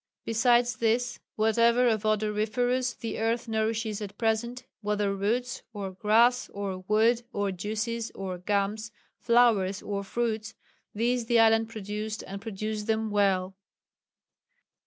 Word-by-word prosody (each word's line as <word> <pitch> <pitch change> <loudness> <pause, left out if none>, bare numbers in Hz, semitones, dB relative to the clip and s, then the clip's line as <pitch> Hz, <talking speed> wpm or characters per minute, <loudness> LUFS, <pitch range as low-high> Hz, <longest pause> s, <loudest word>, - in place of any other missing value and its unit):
Besides 240 +2 +3
this, 235 +2 0 0.2
whatever 230 +3 +3
of 220 -2 +1
odoriferous 215 +4 0
the 230 - -5
earth 230 +2 0
nourishes 220 -1 -1
at 205 -1 -7
present, 235 +3 -1 0.2
whether 205 -1 0
roots, 240 +6 -1
or 200 -3 -5
grass, 225 +6 +3
or 200 -2 -4
wood, 225 +3 +3
or 205 -3 -1
juices, 220 +5 -3
or 185 -2 -5
gums, 205 +3 -1 0.3
flowers 225 -5 +3
or 200 -1 -3
fruits 220 0 -2 0.4
these 235 +2 0
the 235 0 +4
island 225 0 +4
produced 215 0 -5
and 195 +1 -7
produced 215 0 -4
them 220 -1 0
well." 195 -2 +1
220 Hz, 125 wpm, -28 LUFS, 205-235 Hz, 0.4 s, the